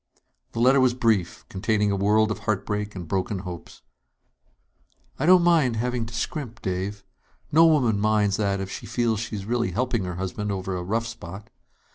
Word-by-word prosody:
The -, -, -4 dB
letter 130 Hz, +3 st, +5 dB
was 130 Hz, -2 st, +3 dB
brief, 110 Hz, -8 st, 0 dB
containing 105 Hz, +1 st, 0 dB
a -, -, +1 dB
world 105 Hz, +2 st, +3 dB
of -, -, -3 dB
heartbreak 105 Hz, 0 st, -2 dB
and 90 Hz, -3 st, -6 dB
broken 95 Hz, +3 st, -1 dB
hopes. 90 Hz, -2 st, -9 dB, 1.4 s
"I 150 Hz, -, 0 dB
don't 180 Hz, -1 st, +7 dB
mind 160 Hz, -9 st, +3 dB
having 120 Hz, 0 st, -1 dB
to 115 Hz, -, -11 dB
scrimp, 120 Hz, -5 st, -4 dB
Dave. 95 Hz, +2 st, -3 dB, 0.5 s
No 165 Hz, +2 st, +7 dB
woman 125 Hz, -10 st, +3 dB
minds 105 Hz, -1 st, +2 dB
that 100 Hz, -2 st, 0 dB
if 95 Hz, 0 st, -5 dB
she -, -, -7 dB
feels 115 Hz, -3 st, 0 dB
she 110 Hz, 0 st, -4 dB
is 100 Hz, -2 st, -5 dB
really 120 Hz, +1 st, 0 dB
helping 120 Hz, -5 st, -1 dB
her 90 Hz, -1 st, -4 dB
husband 95 Hz, +3 st, -3 dB
over 95 Hz, -1 st, -3 dB
a 90 Hz, -, -3 dB
rough 110 Hz, +6 st, -1 dB
spot. 105 Hz, -3 st, -9 dB
110 Hz, 180 wpm, -25 LUFS, 100-120 Hz, 1.4 s, don't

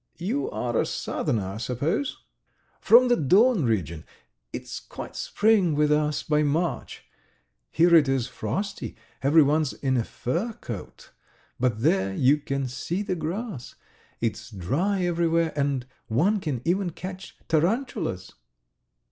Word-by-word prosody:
"You 240 Hz, -, -2 dB
are -, -, -2 dB
a -, -, +2 dB
southerner, 115 Hz, -, -2 dB
I 95 Hz, +2 st, -5 dB
suppose?" 140 Hz, -, -2 dB, 0.6 s
"From 245 Hz, +2 st, +6 dB
the 245 Hz, -, +4 dB
Don 195 Hz, -, +4 dB
region.... 85 Hz, -9 st, -1 dB, 0.5 s
It's -, -, -6 dB
quite -, -, -9 dB
spring 205 Hz, -7 st, +2 dB
with 150 Hz, 0 st, +2 dB
us 150 Hz, 0 st, +1 dB
by 150 Hz, 0 st, +2 dB
March. 155 Hz, +4 st, -1 dB, 0.6 s
Here 170 Hz, +1 st, +4 dB
it 155 Hz, -5 st, +6 dB
is 135 Hz, -3 st, +1 dB
frosty, 125 Hz, -, -4 dB, 0.3 s
everyone's 150 Hz, 0 st, +4 dB
in 130 Hz, -2 st, 0 dB
a 120 Hz, -, +1 dB
fur 175 Hz, -, -3 dB
coat,... 115 Hz, -, -9 dB, 0.5 s
but 120 Hz, -3 st, 0 dB
there 95 Hz, 0 st, +2 dB
you 135 Hz, +6 st, +4 dB
can 140 Hz, -2 st, -2 dB
see 165 Hz, +10 st, -3 dB
the 195 Hz, -2 st, -2 dB
grass... 170 Hz, -, -5 dB, 0.4 s
it's 115 Hz, 0 st, -3 dB
dry 150 Hz, -, -1 dB
everywhere, 170 Hz, -1 st, +1 dB
and 140 Hz, -3 st, 0 dB, 0.2 s
one 180 Hz, -, +2 dB
can 140 Hz, -9 st, -3 dB
even 180 Hz, +2 st, +1 dB
catch 185 Hz, +3 st, -8 dB
tarantulas." 165 Hz, -, 0 dB
150 Hz, 130 wpm, -26 LUFS, 125-185 Hz, 0.6 s, From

